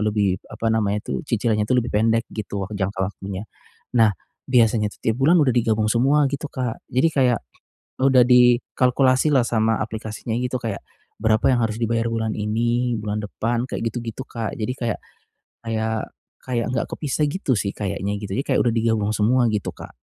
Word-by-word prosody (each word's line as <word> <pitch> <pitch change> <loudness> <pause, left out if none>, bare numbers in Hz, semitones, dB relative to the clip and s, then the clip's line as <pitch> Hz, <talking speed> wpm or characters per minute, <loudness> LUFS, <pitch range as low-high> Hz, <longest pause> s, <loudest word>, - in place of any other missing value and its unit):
lebih 105 -3 +1
apa 115 0 -1
namanya 105 -2 0
tuh, - - -3
cicilannya 110 -3 0
tuh 130 - +3
lebih 120 - -5
pendek 115 +2 +2
gitu 100 -2 -4
wak 100 - -10
jangka 100 -1 -1
waktunya. 95 +1 -6 0.5
Nah, 110 -2 +6 0.4
biasanya 115 -4 +3
tuh - - -17
tiap 115 +3 0
bulan 160 +7 +5
udah 130 -3 +3
digabung 110 -2 +1
semua 135 +6 +3
gitu 140 +1 -3
Kak, 125 -3 -3
Jadi 130 +7 +3
kayak 125 -4 +2 0.6
udah 130 -2 +6
dikalkulasilah 125 +2 +4
sama 110 -1 +1
aplikasinya 110 +1 -6
gitu 125 +1 -2
kayak, 110 -4 -3 0.4
berapa 110 +5 +3
yang 125 - +2
harus 110 -1 -1
dibayar 115 0 +1
bulan 110 -1 -1
ini, 120 +3 0
bulan 105 0 -3
depan 115 +3 -2
kayak - - -3
gitu-gitu, 120 +2 -5
Kak. 115 -3 -4
Jadi 110 +3 -2
kayak 115 -3 -2 0.6
kayak 110 -1 -2 0.3
kayak 120 -3 -2
enggak 120 -2 -1
kepisah 150 0 -1
gitu 150 -4 -1
sih 100 - -1
kayaknya 100 0 -2
gitu. 100 -2 -7
Jadi 135 - -1
kayak - - +3
udah 120 - +2
digabung 110 -2 +1
semua 120 +4 +3
gitu 105 -2 -2
Kak. - - -11
115 Hz, 175 wpm, -22 LUFS, 105-125 Hz, 0.6 s, Nah